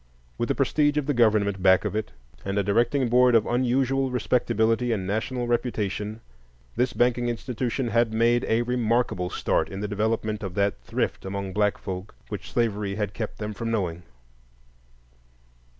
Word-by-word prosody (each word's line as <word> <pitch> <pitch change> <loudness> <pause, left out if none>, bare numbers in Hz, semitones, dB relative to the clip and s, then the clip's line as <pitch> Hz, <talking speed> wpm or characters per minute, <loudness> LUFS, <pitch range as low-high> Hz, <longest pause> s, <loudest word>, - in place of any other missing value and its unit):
With - - -1
the - - +1
prestige 145 -1 +2
of 150 - +1
the 145 - +1
government 105 -5 +2
back 95 0 +5
of - - -2
it, 110 0 -2 0.3
and 100 +1 -2
a 100 - +2
directing 120 +6 +2
board 125 +1 +5
of 110 - +4
unusual 130 +2 +1
respectability 120 -1 +1
and 100 -5 -1
national 120 +5 -2
reputation, 110 -3 -2 0.5
this 125 +2 +1
banking 120 0 +1
institution 120 +1 -2
had 115 0 +2
made 115 +2 +2
a 115 +1 +2
remarkable 120 -6 0
start - - 0
in 95 - -6
the 105 - -2
development 110 +1 -1
of 95 -3 -5
that 100 0 0
thrift - - -2
among 95 0 -4
black 105 +1 +1
folk 95 +1 -6
which - - -6
slavery 105 -4 0
had 105 -1 -2
kept 110 -1 -5
them 105 0 -4
from 115 +3 -4
knowing. 90 -7 -1
115 Hz, 165 wpm, -25 LUFS, 100-120 Hz, 0.5 s, back